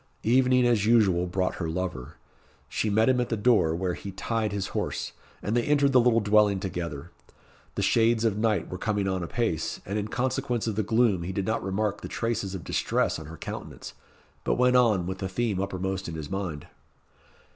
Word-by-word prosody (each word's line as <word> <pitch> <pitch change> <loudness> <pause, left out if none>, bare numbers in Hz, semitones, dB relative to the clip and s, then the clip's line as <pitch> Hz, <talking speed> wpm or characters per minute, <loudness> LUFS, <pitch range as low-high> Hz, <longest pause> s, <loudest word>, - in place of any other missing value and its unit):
Evening 125 +1 +4
as 115 -4 +2
usual 95 -7 +4
brought 90 +1 -1
her 80 - -1
lover. 85 -7 -4 0.5
She 110 - -1
met 110 +2 +3
him 130 -1 +3
at 120 - -2
the 115 - -1
door, 105 -8 +3
where 90 +1 -1
he 100 - -7
tied 110 +3 -2
his 100 -2 -3
horse, - - -2 0.3
and 105 +4 -1
they 120 - +3
entered 145 +1 +3
the 130 - +6
little 120 -1 +4
dwelling 105 -1 +3
together. 85 -4 -5 0.6
The - - -1
shades 115 0 +3
of 110 -3 +2
night 105 -4 0
were 90 - -5
coming 100 -2 0
on 95 -1 -1
apace, 85 -2 -2
and 100 +2 -2
in 105 - -3
consequence 125 -1 -1
of 110 -3 -2
the 110 - +1
gloom 110 -3 +2
he 85 +3 -4
did 95 0 -2
not 110 +2 -1
remark 105 +2 -1
the - - -6
traces 110 -4 -2
of 90 - -6
distress - - 0
on 80 - -9
her 80 +1 -9
countenance, - - -7 0.5
but - - +1
went 125 0 +3
on 110 -8 +4
with 95 +1 -4
the 95 - -3
theme 100 -1 -1
uppermost 95 -1 -3
in 80 - -6
his 80 0 -6
mind. 90 -7 -4
105 Hz, 200 wpm, -27 LUFS, 95-115 Hz, 0.6 s, the